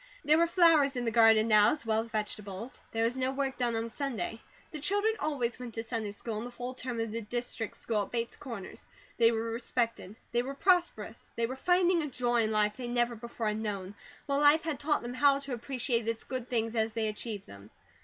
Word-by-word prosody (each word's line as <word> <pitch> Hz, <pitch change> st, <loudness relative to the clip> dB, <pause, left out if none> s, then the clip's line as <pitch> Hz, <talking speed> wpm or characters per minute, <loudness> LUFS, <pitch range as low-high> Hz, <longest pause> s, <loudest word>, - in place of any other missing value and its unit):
There 310 Hz, +2 st, +5 dB
were 335 Hz, -, +4 dB
flowers 330 Hz, -6 st, +5 dB
in 245 Hz, -1 st, -2 dB
the 230 Hz, -, +1 dB
garden 225 Hz, -1 st, +6 dB
now, 210 Hz, +1 st, +6 dB
as 300 Hz, -5 st, -7 dB
well 220 Hz, -1 st, +2 dB
as 230 Hz, +1 st, -4 dB
vegetables. 210 Hz, 0 st, -4 dB
There 225 Hz, 0 st, 0 dB
was 230 Hz, +2 st, +1 dB
no 260 Hz, 0 st, 0 dB
work 270 Hz, -1 st, -2 dB
done 240 Hz, -2 st, +1 dB
on 225 Hz, +1 st, -1 dB
Sunday. 230 Hz, -4 st, -4 dB, 0.3 s
The 305 Hz, -, -5 dB
children 410 Hz, +8 st, +2 dB
always 260 Hz, -6 st, -1 dB
went 245 Hz, -3 st, -7 dB
to 225 Hz, -, -3 dB
Sunday 225 Hz, -2 st, -3 dB
school 210 Hz, +1 st, -4 dB
and 235 Hz, -, -5 dB
the -, -, -8 dB
full 245 Hz, +1 st, -5 dB
term 250 Hz, -2 st, -4 dB
of 225 Hz, -1 st, -2 dB
the 230 Hz, +1 st, -3 dB
District 235 Hz, 0 st, -3 dB
School 220 Hz, -3 st, -1 dB
at 200 Hz, -, -6 dB
Bates 235 Hz, -1 st, -2 dB
Corners. 230 Hz, -8 st, -8 dB, 0.3 s
They 230 Hz, 0 st, +6 dB
were 225 Hz, 0 st, -2 dB
respected, 230 Hz, -3 st, -2 dB, 0.2 s
they 240 Hz, -, +2 dB
were 270 Hz, +3 st, -5 dB
prosperous, 345 Hz, -, +1 dB
they 230 Hz, -, +1 dB
were 255 Hz, +3 st, -4 dB
finding 355 Hz, +3 st, +3 dB
a 300 Hz, -, -2 dB
joy 240 Hz, -3 st, +1 dB
in 220 Hz, -1 st, +1 dB
life 210 Hz, 0 st, +2 dB
they 250 Hz, -2 st, -5 dB
never 240 Hz, 0 st, +1 dB
before 230 Hz, -1 st, -3 dB
had 210 Hz, +1 st, -2 dB
known, 200 Hz, -3 st, -4 dB, 0.3 s
while 280 Hz, -1 st, 0 dB
life 295 Hz, +2 st, +6 dB
had 310 Hz, -4 st, -2 dB
taught 295 Hz, -2 st, +1 dB
them 240 Hz, +1 st, -5 dB
how 275 Hz, +2 st, +4 dB
to 280 Hz, -2 st, -5 dB
appreciate 240 Hz, -1 st, -1 dB
its 230 Hz, 0 st, -1 dB
good 255 Hz, -2 st, -5 dB
things 230 Hz, -2 st, 0 dB
as 220 Hz, -1 st, 0 dB
they 225 Hz, -1 st, 0 dB
achieved 210 Hz, -1 st, -5 dB
them. 100 Hz, +1 st, -13 dB
235 Hz, 230 wpm, -30 LUFS, 220-270 Hz, 0.3 s, garden